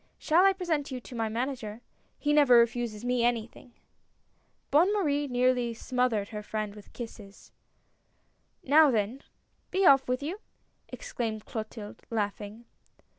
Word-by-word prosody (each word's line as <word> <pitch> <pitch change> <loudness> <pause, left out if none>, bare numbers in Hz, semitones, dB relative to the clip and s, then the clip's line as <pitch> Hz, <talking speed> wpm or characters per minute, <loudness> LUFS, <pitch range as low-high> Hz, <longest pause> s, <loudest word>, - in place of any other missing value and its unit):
Shall 340 +3 +3
I 390 - +4
present 340 -6 -2
you 260 -2 -5
to 245 - -11
my 225 -1 -1
Manager. 235 -2 -4 0.4
He 295 0 0
never 285 -5 +6
refuses 235 -1 +1
me 245 -1 +1
anything! 240 0 -2 0.5
" - - -43
Bonne 335 +7 +5
Marie 295 -8 0
nearly 245 -2 +1
smothered 245 -4 -1
her 210 -1 -6
friend 210 -1 -4
with 210 -1 -14
kisses. 215 -4 -10 1.1
"Now 300 +2 +6
then, 230 +2 -1 0.5
be 385 0 +1
off 270 -5 +6
with 255 +2 -1
you!" 350 +8 -4 0.5
exclaimed 230 - -5
Clotilde, 215 -2 -7
laughing. 210 +1 -4
245 Hz, 135 wpm, -28 LUFS, 220-285 Hz, 1.1 s, never